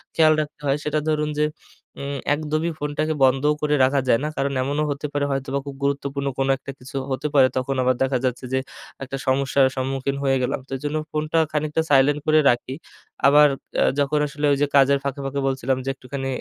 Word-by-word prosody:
খেয়াল 155 -1 +5
রাখতে 150 0 -8
হয়, 140 +1 +2
সেটা 150 0 0
ধরুন 150 0 0
যে 150 - +4 0.6
উম 140 0 -4 0.2
একদমই 155 +2 -2
ফোনটাকে 150 +2 -1
বন্ধ 135 +1 +3 0.2
করে 150 0 +2
রাখা 135 +1 +3
যায় 115 - +4
না। - - 0
কারণ 140 0 0
এমনও 145 +3 -1
হতে 145 +1 -3
পারে 145 0 0
হয়তোবা 135 0 -2
খুব 140 -1 -7
গুরুত্বপূর্ণ 140 0 -1
কোন 135 - +1
একটা 140 +1 -8
কিছু 130 +2 -12 0.2
হতে 140 +3 -1
পারে। 130 -2 +7
তখন 130 +1 -1
আবার 130 0 +2
দেখা 130 -1 +1
যাচ্ছে 125 0 -2
যে, 130 - +2 0.4
একটা 135 +1 -5
সমস্যার 135 +1 +3
সম্মুখীন 135 +1 -2
হয়ে 135 -1 +2
গেলাম। 125 - -1
তো - - -21
এজন্য 150 +3 -3
ফোনটা 155 +1 -1
খানিকটা 150 +1 0
সাইলেন্ট 145 +2 +4
করে 155 0 +5
রাখি। 120 +2 0 0.5
আবার 150 +1 +7 0.3
অ্যা - - +4
যখন 145 +1 +1
আসলে 145 +1 -3
ওই 140 - +2
যে 145 - +3
কাজের 140 0 +5
ফাঁকে, 140 0 -3
ফাঁকে 140 +1 -2
বলছিলাম 130 -1 0
যে, - - -1
একটুখানি 135 +1 -6
140 Hz, 200 wpm, -23 LUFS, 135-150 Hz, 0.6 s, পারে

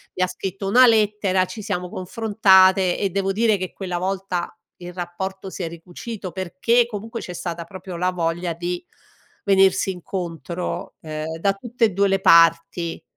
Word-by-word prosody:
mi 185 - +1
ha - - +2
scritto 195 +2 -5
una 250 +6 +7
lettera 210 -4 +3
ci 215 +3 -8
siamo 180 -4 -3
confrontate 190 -2 +3
e 200 - 0
devo 195 +1 -1
dire 215 +1 +2
che 185 -1 -5
quella 180 -3 -4
volta 185 -1 -3 0.2
il 175 0 -9
rapporto 190 +2 -5
si 185 - -6
è - - -2
ricucito 180 +4 -8
perché 190 +7 +1
comunque 225 +1 -6
c'è 180 - -7
stata 170 -1 -5
proprio 185 +1 -9
la 180 +2 +1
voglia 170 0 -2
di 175 +1 -4 0.6
venirsi 195 -1 +4
incontro, 175 -1 -5
ehm, 155 0 -5
da 195 +3 +2
tutte 235 +3 0
e - - +2
2 200 +1 +2
le 195 0 +1
parti 165 0 +4
185 Hz, 165 wpm, -22 LUFS, 175-200 Hz, 0.6 s, una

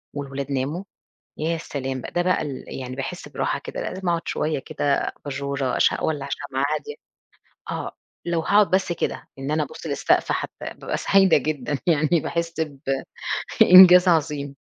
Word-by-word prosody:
والولاد 140 -1 -5
ناموا، 140 +7 -2 0.6
يا 165 +2 0
سلام 135 -4 -4
ده 175 - -2
بقى 180 0 +1
ال 135 -3 -6
يعني 130 0 -6
باحس 155 +7 -6
براحة - - -2
كده، - - -6
لأ - - -3
لازم 185 -1 -4
أقعد 170 -1 -1
شوية 155 -2 -1
كده 140 +1 -1 0.3
أباجورة، 140 -2 -2
أش - - +4
أولع 145 -3 -2
شمعة 135 -1 -2
هادية. 445 - -6 0.8
آه، - - -5 0.3
لو 170 -1 0
هاقعد 205 +5 +3
بس 190 -2 +1
كده - - -3
إن 135 +1 -4
أنا 155 0 +1
أبُص 145 - -7
للسقف - - +1
حتى - - -3
بابقى - - -5
سعيدة 195 -2 +4
جدًا 145 -1 -2
يعني 155 +1 +3
باحس 170 0 -3
ب 145 -4 -4 0.8
إنجاز 180 0 +9
عظيم. 150 -4 +1
155 Hz, 160 wpm, -23 LUFS, 140-175 Hz, 0.8 s, إنجاز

